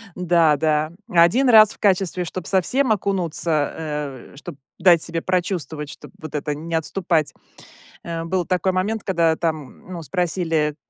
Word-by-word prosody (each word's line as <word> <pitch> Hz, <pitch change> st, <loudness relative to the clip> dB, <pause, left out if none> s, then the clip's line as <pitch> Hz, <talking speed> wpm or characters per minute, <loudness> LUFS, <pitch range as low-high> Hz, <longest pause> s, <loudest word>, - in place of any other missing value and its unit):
Да, 170 Hz, -4 st, +3 dB
да, 155 Hz, 0 st, 0 dB, 0.2 s
1 175 Hz, +10 st, +4 dB
раз 215 Hz, -2 st, +7 dB
в -, -, -16 dB
качестве, 185 Hz, -3 st, +1 dB
чтоб 180 Hz, +1 st, -6 dB
совсем 240 Hz, +7 st, +1 dB
окунуться, 170 Hz, -7 st, 0 dB, 0.6 s
э, -, -, -17 dB
чтоб 145 Hz, -, -9 dB, 0.2 s
дать 175 Hz, -2 st, +5 dB
себе 165 Hz, 0 st, -3 dB
прочувствовать, 170 Hz, -5 st, -2 dB
чтоб -, -, -12 dB
вот 155 Hz, -1 st, -8 dB
это 150 Hz, 0 st, -2 dB
не 165 Hz, +3 st, -7 dB
отступать, 165 Hz, -1 st, 0 dB, 0.7 s
э. 165 Hz, -1 st, -4 dB
Был 180 Hz, +1 st, -1 dB
такой 185 Hz, 0 st, 0 dB
момент, 205 Hz, +4 st, -2 dB
когда 165 Hz, -4 st, +2 dB
там, 155 Hz, -3 st, -4 dB
ну, 175 Hz, -2 st, -6 dB
спросили, 165 Hz, -3 st, -1 dB
170 Hz, 150 wpm, -21 LUFS, 160-185 Hz, 0.7 s, раз